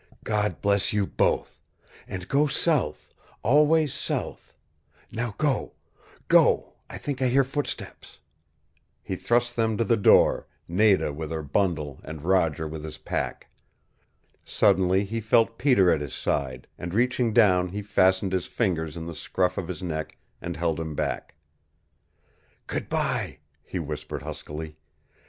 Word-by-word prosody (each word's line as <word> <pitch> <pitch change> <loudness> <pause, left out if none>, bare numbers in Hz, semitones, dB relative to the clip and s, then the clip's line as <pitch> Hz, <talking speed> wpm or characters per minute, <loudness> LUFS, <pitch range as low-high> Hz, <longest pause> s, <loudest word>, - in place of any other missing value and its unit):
"God 105 -1 -1
bless 100 -1 +2
you 105 -1 +2
both! - - 0 0.5
And 90 -1 -6
go 145 +2 +3
south 145 - 0 0.3
always 150 +3 +4
south. - - -4 0.6
Now 115 -2 -3
go 150 -3 0 0.5
go! - - +4 0.2
I - - -7
think 140 -3 -4
I 130 - +3
hear 135 +2 +4
footsteps 140 +2 -5 0.4
" 75 - -45 0.3
He - - -3
thrust 120 0 +1
them 110 -2 +1
to 115 - +2
the 115 +1 +2
door, 100 - +4 0.2
Nada 95 -3 +3
with 80 +1 -5
her 80 -1 -3
bundle 75 -3 -1
and 80 0 -8
Roger 85 -3 +1
with 75 0 -7
his 80 -1 -7
pack. - - -4 0.9
Suddenly 95 +1 +3
he 115 +3 -3
felt 115 +1 +2
Peter 110 -11 +4
at 75 - +1
his 70 -3 -5
side, 65 -3 -2
and 85 +2 -5
reaching 125 0 +2
down 95 -6 +4
he 100 +3 -5
fastened 95 -1 +2
his 95 -2 -1
fingers 85 -7 -1
in 80 - -5
the 85 - -6
scruff 90 +3 -1
of 95 - -4
his 90 -1 -6
neck, 80 -3 -4 0.2
and 85 0 -5
held 85 -1 0
him 80 -2 -4
back. - - -3 1.3
"Good - - -4
bye," - - -1 0.3
he - - -6
whispered 75 -1 -5
huskily. 75 +1 -7
95 Hz, 145 wpm, -26 LUFS, 80-115 Hz, 1.3 s, always